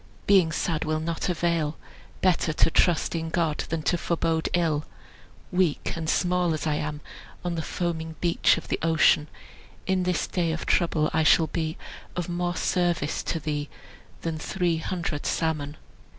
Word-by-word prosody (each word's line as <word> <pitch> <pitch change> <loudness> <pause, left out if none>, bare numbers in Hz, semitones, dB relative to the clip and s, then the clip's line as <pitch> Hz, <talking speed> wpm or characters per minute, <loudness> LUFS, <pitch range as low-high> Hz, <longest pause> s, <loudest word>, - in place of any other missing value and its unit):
Being 190 -5 +5
sad 165 -1 -1
will 155 0 0
not 165 +3 -2
avail; 170 -3 0 0.4
Better 175 -3 +2
to 165 - +3
trust 175 -1 +3
in 165 -1 -2
God 160 -2 0
than 160 -1 -2
to 175 - +1
forbode 165 -1 0
ill; 160 -4 +1 0.7
Weak 180 -4 +1
and 160 -1 -3
small 180 -2 +2
as 155 - -4
I 155 - +1
am, 150 0 -3 0.4
On 175 - 0
the 165 - -2
foaming 160 -1 -3
beach 170 -1 +3
of 165 - -7
the - - 0
ocean, 160 -2 +4 0.6
In 190 0 +1
the 180 -1 0
day 170 -3 +1
of 160 - -4
trouble 160 -3 +2
I 160 - +3
shall 160 +1 +5
be 160 +1 -3 0.4
Of 180 -2 -2
more 175 0 -1
service 175 -5 0
to 165 - -2
thee 150 -1 -3 0.5
than 165 -1 -3
three 175 0 0
hundred 165 -2 -3
salmon." 155 -2 -1
165 Hz, 165 wpm, -26 LUFS, 155-175 Hz, 0.7 s, Being